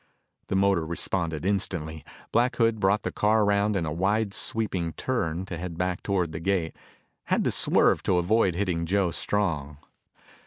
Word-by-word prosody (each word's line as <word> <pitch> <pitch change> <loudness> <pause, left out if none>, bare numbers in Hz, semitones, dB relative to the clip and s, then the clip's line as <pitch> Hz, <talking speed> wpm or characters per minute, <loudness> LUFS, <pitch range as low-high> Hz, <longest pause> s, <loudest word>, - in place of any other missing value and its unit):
The - - -2
motor 95 -3 +3
responded 85 -1 -2
instantly. 85 -6 -1 0.3
Black 120 +2 +2
Hood 115 -2 +2
brought 100 +1 +2
the - - -2
car 110 +1 +2
around 100 +1 +2
in 85 -4 0
a 75 - -3
wide 100 +4 0
sweeping 95 -9 -1
turn 90 - -2
to 90 -3 -6
head 85 -1 -6
back 90 0 -1
toward 90 -5 -1
the 80 - -5
gate, 85 -2 -1 0.5
had - - +1
to - - +1
swerve - - +3
to 90 - +2
avoid 95 +1 +2
hitting 90 -4 -1
Joe 95 -1 +1
Strong. 80 -10 -1
95 Hz, 165 wpm, -26 LUFS, 85-105 Hz, 0.5 s, motor